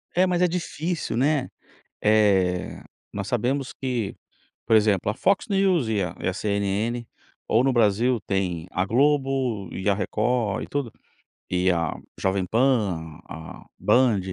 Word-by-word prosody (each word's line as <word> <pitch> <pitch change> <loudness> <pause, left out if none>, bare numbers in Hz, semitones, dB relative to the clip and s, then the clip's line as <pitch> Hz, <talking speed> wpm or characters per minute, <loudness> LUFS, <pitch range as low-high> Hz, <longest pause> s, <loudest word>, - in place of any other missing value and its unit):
É, 185 - +5
mas 180 -1 0
é 180 - +5
difícil, 165 -5 -3
né? 135 +1 +1 0.5
Eh, 100 -4 +2 0.3
nós 100 -1 -4
sabemos 130 +4 -1
que, 125 -6 -3 0.5
por 110 - +3
exemplo, 105 -2 +2
a 105 - -3
Fox 195 +7 +1
News 190 - +2
e 105 -3 +1
a 85 -2 -4
e - - -4
a - - 0
CNN 105 +4 -1 0.4
ou 115 +3 +3
no 135 - +2
Brasil, 115 +1 +3
tem 90 -4 -1
a 90 - 0
Globo 135 - +1
e 95 - -3
a - - +3
Record, 110 +1 0
e - - -9
tudo. 140 -5 -3 0.6
E 90 0 +2
a 85 -3 -1 0.2
Jovem 95 -1 0
Pan, 100 - 0
a 80 0 -9
a - - -18
Band. 120 -5 +4
110 Hz, 155 wpm, -24 LUFS, 95-135 Hz, 0.6 s, É